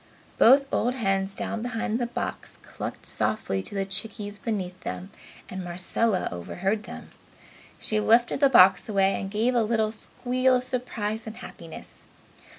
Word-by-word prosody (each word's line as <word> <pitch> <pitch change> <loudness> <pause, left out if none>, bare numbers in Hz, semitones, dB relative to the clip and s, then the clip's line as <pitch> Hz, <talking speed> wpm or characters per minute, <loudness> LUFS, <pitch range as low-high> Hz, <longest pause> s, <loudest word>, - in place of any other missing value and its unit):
Both 275 +4 +7
old 245 +2 +1
hens 195 -4 0
down 225 - -3
behind 235 -1 -2
the 240 - -1
box 240 - -5
clucked - - -7
softly 95 - -1
to 205 - -5
the 195 -1 0
chickies 205 +1 -4
beneath 190 -5 -3
them 90 - -6 0.4
and 185 0 -6
Marcella 185 +4 +1
overheard 190 - -2
them. - - -10 0.7
She 215 - -1
lifted 235 +4 +3
the 280 -1 +5
box 190 -4 +6
away 195 -1 +2
and 195 - -4
gave 220 +5 +1
a 240 - +3
little 220 -1 +1
squeal 255 +3 0
of 250 - 0
surprise 230 -4 -3
and 220 - -7
happiness. 165 -1 -11
215 Hz, 155 wpm, -26 LUFS, 195-235 Hz, 0.7 s, Both